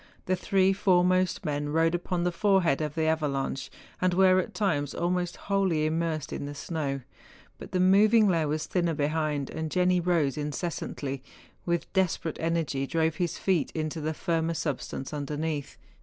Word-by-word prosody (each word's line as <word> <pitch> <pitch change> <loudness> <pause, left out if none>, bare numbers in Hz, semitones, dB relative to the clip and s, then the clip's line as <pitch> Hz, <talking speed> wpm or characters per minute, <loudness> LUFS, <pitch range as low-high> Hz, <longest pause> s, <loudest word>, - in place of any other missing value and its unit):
The 185 - +1
three 190 +1 +2
foremost 185 -1 +2
men 145 -1 -1
rode 165 +2 +2
upon 175 0 -1
the 180 - +1
forehead 185 -5 +2
of 150 -1 -3
the 160 - 0
avalanche, 145 -4 -1 0.3
and 180 -1 +2
were 185 0 +5
at 185 - -4
times 145 -9 0
almost 175 0 -1
wholly 190 -6 0
immersed 160 -1 -1
in 140 - -4
the 145 - -6
snow; 140 -2 -3 0.6
but - - -10
the 185 - 0
moving 210 +4 +5
layer 165 -5 +2
was 155 +1 -1
thinner 170 -3 0
behind, 150 -1 -1
and 160 0 -3
Jenni 180 +1 +2
rose 165 -5 +1
incessantly, 145 -2 -3
and - - -24
with 170 0 -1
despe¬ 190 -4 +1
rate 160 - -3
energy 160 -5 -1
drove 160 0 0
his 175 -2 -1
feet 185 -6 +1
into 155 0 -2
the 155 +1 -2
firmer 165 0 -1
substance 145 -2 -4
underneath. 150 0 -3
165 Hz, 170 wpm, -28 LUFS, 150-180 Hz, 0.6 s, were